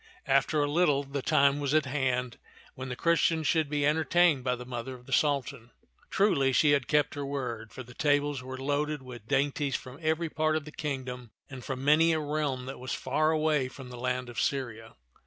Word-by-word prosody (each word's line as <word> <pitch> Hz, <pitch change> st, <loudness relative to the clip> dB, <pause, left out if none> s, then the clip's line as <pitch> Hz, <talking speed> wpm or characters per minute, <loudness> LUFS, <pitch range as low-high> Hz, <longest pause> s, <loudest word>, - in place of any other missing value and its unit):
After 145 Hz, +2 st, +2 dB
a -, -, 0 dB
little, 150 Hz, -4 st, +3 dB
the 140 Hz, 0 st, -4 dB
time 140 Hz, -1 st, +3 dB
was 145 Hz, +1 st, 0 dB
at 155 Hz, -2 st, +3 dB
hand 130 Hz, -3 st, -1 dB, 0.3 s
when 130 Hz, 0 st, -7 dB
the 125 Hz, -, -4 dB
Chris 170 Hz, +5 st, +2 dB
tians 160 Hz, -2 st, +1 dB
should 160 Hz, -2 st, +2 dB
be 145 Hz, -1 st, 0 dB
entertained 155 Hz, -1 st, +3 dB
by 125 Hz, -1 st, 0 dB
the 125 Hz, 0 st, -9 dB
mother 125 Hz, +1 st, -5 dB
of 125 Hz, 0 st, -15 dB
the -, -, -6 dB
Sultan. 140 Hz, -5 st, 0 dB, 0.4 s
Truly, 140 Hz, -10 st, +2 dB
she 145 Hz, +3 st, +4 dB
had 140 Hz, -3 st, +2 dB
kept 150 Hz, -1 st, +2 dB
her 145 Hz, -, -4 dB
word, 125 Hz, -6 st, -4 dB
for 130 Hz, -, -8 dB
the 125 Hz, +1 st, -14 dB
tables 145 Hz, 0 st, +1 dB
were 130 Hz, +1 st, -7 dB
loaded 145 Hz, +1 st, -1 dB
with 120 Hz, -4 st, -11 dB
dainties 140 Hz, 0 st, 0 dB
from 130 Hz, +3 st, -7 dB
every 160 Hz, +1 st, 0 dB
part 155 Hz, 0 st, 0 dB
of 155 Hz, -2 st, -2 dB
the 155 Hz, -, -9 dB
kingdom 130 Hz, -5 st, -5 dB, 0.2 s
and 130 Hz, -2 st, -8 dB
from 130 Hz, +1 st, -5 dB
many 160 Hz, +3 st, +5 dB
a 160 Hz, -, +1 dB
realm 145 Hz, -4 st, -2 dB
that 135 Hz, 0 st, -7 dB
was 130 Hz, +1 st, -4 dB
far 155 Hz, +4 st, 0 dB
away 155 Hz, -4 st, +1 dB
from 130 Hz, 0 st, -11 dB
the 125 Hz, -, -8 dB
land 125 Hz, 0 st, -2 dB
of 120 Hz, -, -3 dB
Syria. 115 Hz, -5 st, -3 dB
140 Hz, 210 wpm, -29 LUFS, 130-150 Hz, 0.4 s, many